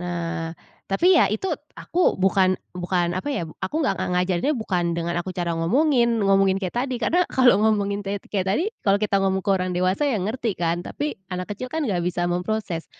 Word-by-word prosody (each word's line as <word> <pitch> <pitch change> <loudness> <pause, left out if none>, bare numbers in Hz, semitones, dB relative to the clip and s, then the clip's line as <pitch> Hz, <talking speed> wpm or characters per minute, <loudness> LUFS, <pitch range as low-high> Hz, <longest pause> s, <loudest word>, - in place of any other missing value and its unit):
Nah, 170 -2 -3 0.4
tapi 345 - +4
ya 290 - +5
itu 295 - -2 0.3
aku 355 +1 +1
bukan 185 0 +3 0.2
bukan 175 -1 0
apa, 190 +10 -3
ya, 220 - -2 0.2
aku 300 - -3
nggak - - +1
nga - - -1
ngajarin 185 - +1
bukan 185 -6 -1
dengan 170 0 -2
aku 185 +1 -5
cara 175 -1 -1
ngomongin, 235 - +2
ngomongin 195 -1 +4
kayak 185 +4 -4
tadi, 255 -2 -3
karena 355 +9 +3
kalau 250 -6 +5
ngomongin 205 -2 +1
tet 200 0 -3
kayak 195 -2 0
tadi 305 - +1 0.2
kalau 200 -1 +4
kita 205 -2 +2
ngomong 190 -1 +1
ke 200 - +1
orang 185 -1 -1
dewasa, 185 +11 +1
ya, 255 - +1
ngerti 220 +2 -2
kan 170 0 0
tapi 295 +1 -4
anak 180 +2 -4
kecil, 255 +5 -6
kan, 320 -1 -1
nggak 190 -6 0
bisa 175 0 -1
memproses. 180 -1 -2
195 Hz, 200 wpm, -23 LUFS, 180-230 Hz, 0.4 s, ya